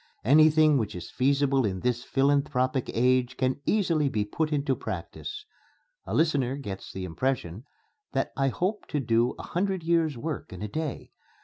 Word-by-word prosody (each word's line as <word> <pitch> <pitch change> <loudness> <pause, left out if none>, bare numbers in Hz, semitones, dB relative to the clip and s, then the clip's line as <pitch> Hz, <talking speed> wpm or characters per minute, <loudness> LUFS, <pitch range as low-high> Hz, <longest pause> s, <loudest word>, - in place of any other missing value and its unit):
Anything 155 +2 +6
which 110 -5 -3
is 90 - -7
feasible 140 0 +2
in 95 -4 -2
this 120 -1 0
philanthropic 135 -2 +1
age 125 +1 +2
can 130 +1 0
easily 165 -9 +2
be 105 -5 -1
put 155 +9 -2
into 140 -2 +1
practice.... 115 - -6 0.6
A - - -2
listener 140 -5 +2
gets 100 -9 -7
the 95 -1 -5
impression 105 +1 -2 0.5
that 135 - 0
I 135 0 +1
hope 185 - -2
to 150 - -1
do 120 -1 +1
a - - -8
hundred 190 0 -1
years' 165 -4 +1
work 155 +2 -5
in 95 +2 -7
a - - -2
day. 155 +4 -4
135 Hz, 165 wpm, -27 LUFS, 120-155 Hz, 0.6 s, Anything